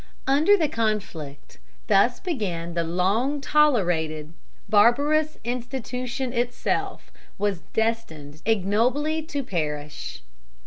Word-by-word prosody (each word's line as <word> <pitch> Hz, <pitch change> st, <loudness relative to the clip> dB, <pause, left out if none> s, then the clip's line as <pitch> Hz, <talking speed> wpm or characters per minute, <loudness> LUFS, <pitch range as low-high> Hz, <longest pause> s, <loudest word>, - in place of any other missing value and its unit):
Under 305 Hz, +10 st, +5 dB
the 320 Hz, -5 st, +2 dB
conflict 200 Hz, -, -3 dB, 0.3 s
thus 215 Hz, +4 st, +3 dB
begun 185 Hz, -, -3 dB
the 170 Hz, 0 st, 0 dB
long 195 Hz, -, +1 dB
tolerated 175 Hz, -, +1 dB, 0.3 s
barbarous 290 Hz, +9 st, +3 dB
institution 250 Hz, +1 st, -3 dB
itself 240 Hz, 0 st, -2 dB, 0.3 s
was 200 Hz, -4 st, -1 dB
destined 165 Hz, -10 st, -2 dB
ignobly 230 Hz, +10 st, +1 dB
to 295 Hz, -3 st, -4 dB
perish. 150 Hz, -, -4 dB
225 Hz, 90 wpm, -25 LUFS, 175-270 Hz, 0.3 s, Under